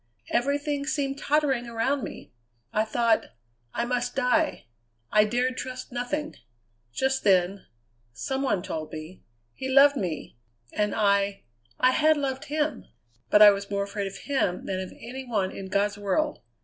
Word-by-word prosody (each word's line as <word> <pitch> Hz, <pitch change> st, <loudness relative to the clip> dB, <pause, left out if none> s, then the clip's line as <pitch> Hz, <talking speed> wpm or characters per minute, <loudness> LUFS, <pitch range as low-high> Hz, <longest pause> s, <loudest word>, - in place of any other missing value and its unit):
Everything 285 Hz, +3 st, 0 dB
seemed 280 Hz, -2 st, -1 dB
tottering 275 Hz, -5 st, +1 dB
around 235 Hz, +4 st, 0 dB
me. -, -, -8 dB, 0.4 s
I 215 Hz, +1 st, +2 dB
thought 230 Hz, 0 st, +2 dB, 0.5 s
I -, -, -1 dB
must 245 Hz, 0 st, -1 dB
die; 290 Hz, +4 st, +1 dB, 0.5 s
I 210 Hz, 0 st, +5 dB
dared 250 Hz, +4 st, 0 dB
trust 255 Hz, 0 st, -6 dB
nothing. 280 Hz, +5 st, -3 dB, 0.5 s
Just 265 Hz, -, 0 dB
then 190 Hz, 0 st, +2 dB, 0.4 s
some 265 Hz, -, -3 dB
one 205 Hz, -10 st, 0 dB
told 155 Hz, -1 st, -5 dB
me 160 Hz, +4 st, -8 dB, 0.3 s
he 265 Hz, -, -5 dB
loved 280 Hz, +2 st, +7 dB
me; 170 Hz, -, -4 dB, 0.3 s
and 210 Hz, -1 st, 0 dB
I 200 Hz, -1 st, +2 dB, 0.4 s
I 255 Hz, -, +5 dB
had 310 Hz, +3 st, +4 dB
loved 270 Hz, -2 st, -2 dB
him. 300 Hz, -3 st, -1 dB, 0.4 s
But 210 Hz, -, +7 dB
I 205 Hz, -, +11 dB
was 200 Hz, 0 st, -4 dB
more 200 Hz, 0 st, 0 dB
afraid 200 Hz, 0 st, -3 dB
of 195 Hz, -, -7 dB
him 260 Hz, -11 st, -1 dB
than 190 Hz, -1 st, -2 dB
of 185 Hz, -1 st, -5 dB
any 255 Hz, +3 st, -7 dB
one 210 Hz, -7 st, -1 dB
in 195 Hz, -, -7 dB
God's 200 Hz, +2 st, 0 dB
world. 295 Hz, +10 st, 0 dB
240 Hz, 155 wpm, -26 LUFS, 200-275 Hz, 0.5 s, I